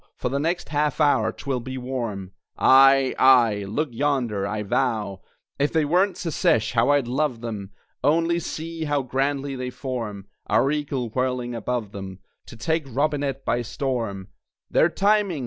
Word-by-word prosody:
For - - -2
the 140 +2 -1
next 170 +4 -1
half 150 0 0
hour 145 -2 +3
'twill 135 -3 -3
be 130 +2 -6
warm 120 -7 -4 0.3
Aye, 135 0 +6
aye, 115 -6 +5
look 145 +9 -1
yonder! 120 -6 0
I 105 +1 -3
vow, 105 -3 -1 0.4
If 145 +1 +2
they 160 -2 +2
weren't 180 +6 +2
Secesh, 160 - +1
how 120 +2 +2
I'd 145 -4 +3
love 130 -2 -1
them! 105 -5 -5 0.3
Only 165 +3 +2
see 165 0 -5
how 145 -2 0
grandly 135 +2 -1
they 125 -1 -4
form 115 -7 -5 0.2
(Our 120 +6 +3
eagle 140 -5 -2
whirling 125 0 -2
above 115 -2 -3
them), 95 -2 -7 0.3
To 120 - -11
take 160 +7 -1
Robinett 140 0 -1
by 120 +2 +1
storm! 115 -6 -3 0.4
They're 165 - +4
timing! 200 -2 +1
130 Hz, 155 wpm, -24 LUFS, 115-145 Hz, 0.4 s, Aye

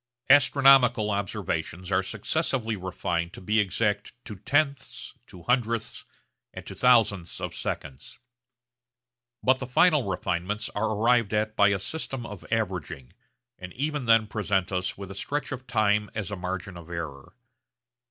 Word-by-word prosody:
Astronomical 135 -6 +5
observations 95 -2 -3
are 95 0 +3
successively 115 - -2
refined 90 -2 -3
to - - -9
be 105 +4 +1
exact 105 +1 0
to 105 - -7
tenths, 140 +7 -1
to 90 - -13
hundredths, 115 0 -1 0.5
and - - -8
to - - -7
thousandths 110 -8 +2
of - - -4
seconds. 70 -3 -6 1.3
But 130 +1 +3
the 125 - -5
final 150 +2 +4
refinements 95 +2 -2
are 110 +2 -1
arrived 115 0 +2
at 110 0 -1
by 100 - +5
a 100 -1 +2
system 135 - -4
of 105 -5 -9
averaging, 90 - -3 0.5
and 90 0 -8
even 150 0 -2
then 115 -1 +5
present 100 -3 -1
us 95 0 -2
with 100 -1 -8
a - - -6
stretch 145 +11 -3
of 130 -1 -6
time 105 -3 +1
as 105 -3 -4
a - - -2
margin 90 0 -5
of 85 -1 -12
error. 80 -5 -7
105 Hz, 145 wpm, -26 LUFS, 95-125 Hz, 1.3 s, Astronomical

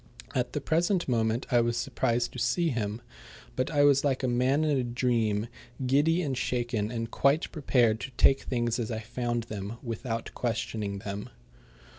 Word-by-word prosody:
At 125 -1 -1
the 150 - -2
present 175 +5 +1
moment 115 -1 +1
I 120 -1 +5
was 120 0 0
surprised 120 +1 0
to 125 - -6
see 170 +8 +1
him, 110 -3 -2 0.5
but 130 - 0
I 145 -2 +3
was 140 -1 +5
like 135 -2 0
a - - +2
man 130 +5 +2
in 150 -2 +2
a 130 - +1
dream, 120 -3 0 0.4
giddy 150 +7 +3
and 135 -4 -1
shaken 120 -4 -1
and 115 -1 -4
quite 140 +4 +2
prepared 120 -7 +2
to 130 - -6
take 135 - +5
things 120 -1 -1
as 115 - -2
I 110 - -2
found 120 +1 -2
them 105 0 -6
without 115 -1 -4
questioning 110 -3 -2
them. 100 +4 -5
120 Hz, 175 wpm, -28 LUFS, 115-135 Hz, 0.5 s, I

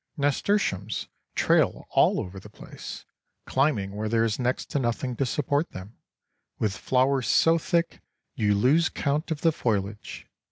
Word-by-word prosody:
Nasturtiums 140 - 0 0.3
trail - - +2
all - - +4
over 95 +1 -6
the - - -13
place, - - -10 0.4
climbing 130 -8 +1
where 105 +2 -3
there 115 0 +2
is 115 0 -1
next 125 0 -1
to 145 - +1
nothing 125 0 -2
to 135 - 0
support 145 +4 0
them, 95 +5 -9 0.6
with 105 -3 -1
flowers 130 0 +1
so 165 +1 +4
thick 170 +1 -1 0.3
you 105 -1 +1
lose 145 +11 +3
count 150 +4 -1
of 160 -2 -3
the 165 - +4
foliage. 105 -6 -3
125 Hz, 150 wpm, -26 LUFS, 105-145 Hz, 0.6 s, all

